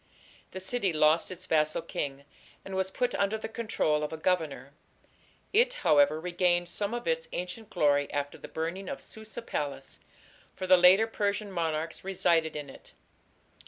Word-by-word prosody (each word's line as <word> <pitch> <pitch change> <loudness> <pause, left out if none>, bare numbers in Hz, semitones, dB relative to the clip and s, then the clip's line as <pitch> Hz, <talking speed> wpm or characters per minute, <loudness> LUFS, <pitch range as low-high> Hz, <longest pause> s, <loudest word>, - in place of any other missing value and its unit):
" - - -27
The 185 - -5
city 200 0 0
lost 155 +1 +3
its 185 0 -7
vassal 155 -3 +1
king, 140 0 -4 0.4
and 195 - -7
was 190 0 0
put 245 +5 -1
under 200 +2 0
the 220 - -5
control 220 -9 0
of 150 - -3
a 160 - -5
governor. 155 -6 -1 0.8
It, - - +4
however, 150 - +4
regained 175 0 +1
some 205 +5 -1
of 240 - -5
its 485 0 0
ancient 180 +5 -5
glory 145 -6 +2
after 145 0 -3
the - - -9
burning 170 +5 -4
of 280 - -5
Susa 220 +1 -7
palace, 145 -9 -4 0.6
for 185 - -4
the 185 0 +7
later 185 +4 +6
Persian 205 -2 -2
monarchs 165 -2 -2
resided 170 -4 +1
in 145 -1 -5
it. 135 - -14
180 Hz, 165 wpm, -29 LUFS, 155-205 Hz, 0.8 s, the